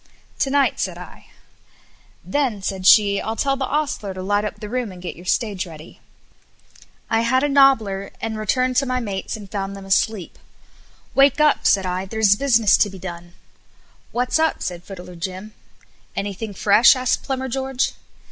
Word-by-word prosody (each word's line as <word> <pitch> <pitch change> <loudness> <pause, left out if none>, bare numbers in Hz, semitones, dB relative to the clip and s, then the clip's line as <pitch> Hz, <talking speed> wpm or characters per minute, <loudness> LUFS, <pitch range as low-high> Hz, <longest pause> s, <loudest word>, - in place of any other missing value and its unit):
"To 270 - +1
night," 280 0 +2
said - - -2
I. - - -12 1.0
"Then," 255 -9 -1
said 190 -1 -2
she, 200 -2 +6
"I'll 220 - -3
tell 275 +3 0
the 270 -1 -3
ostler 280 -10 -2
to 185 - -6
light 205 +2 +1
up 210 - -5
the 210 - -7
room 240 -1 -3
and 180 - -11
get 180 - -6
your 175 +2 -13
stage 200 -4 -1
ready." 160 -1 -12 1.1
I 225 0 +1
had 260 +3 +2
a - - +3
nobbler 225 -9 +3
and 225 -1 -4
returned 255 +4 0
to 275 0 +2
my 255 0 0
mates 200 -3 -4
and 200 -3 -12
found 195 -1 -4
them 195 -1 -10
asleep. 195 0 0 0.7
"Wake 275 +1 +4
up," 300 0 +3
said 195 -2 +3
I, 185 +1 -2
"there's 210 0 +3
business 230 -4 +4
to 205 - +2
be 195 - -10
done." 175 -1 -8 0.8
"What's 250 +5 0
up?" 320 0 0
said 175 -1 -5
Fiddler 180 -2 -10
Jim. 185 +5 -6 0.6
"Anything 200 +1 -4
fresh?" 210 +7 +6
asked 255 -1 0
Plumber 265 -1 -3
George. 265 0 -1
215 Hz, 175 wpm, -21 LUFS, 195-255 Hz, 1.1 s, she